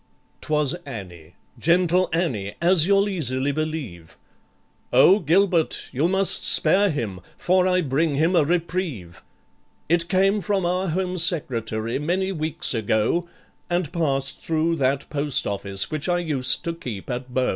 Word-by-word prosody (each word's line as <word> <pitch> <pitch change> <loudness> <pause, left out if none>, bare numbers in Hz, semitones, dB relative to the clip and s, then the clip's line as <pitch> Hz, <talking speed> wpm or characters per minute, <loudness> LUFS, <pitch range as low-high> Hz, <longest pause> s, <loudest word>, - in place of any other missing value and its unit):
'Twas 150 -3 0
ANNIE, 90 - -10 0.2
gentle 180 +2 +2
ANNIE, 125 - -2
as 170 -1 +4
you'll 200 0 +3
easily 140 -7 -2
believe. 140 - -5 0.7
"O 195 +4 +6
GILBERT, 175 0 +1
you 145 +6 0
must 190 0 +2
spare 200 +1 +4
him, 110 - -4 0.2
for 185 +1 +2
I 185 0 +2
bring 150 +1 0
him 165 +6 +1
a 165 - +4
reprieve, 165 - -3 0.7
It 170 +1 +1
came 195 +2 +2
from 195 0 -1
our 180 +2 -1
Home 180 +2 -2
Secretary 115 - 0
many 185 +6 -1
weeks 155 -5 -3
ago, 110 +10 0 0.4
And 175 -3 -2
passed 135 -5 +1
through 165 +1 0
that 135 0 0
post 145 -2 +1
office 100 -1 -3
which 155 +3 -3
I 175 - +2
used 145 -7 +1
to 170 - -3
keep 120 -11 -8
at 125 +1 -5
Bow. 130 0 0
155 Hz, 145 wpm, -23 LUFS, 130-180 Hz, 0.7 s, O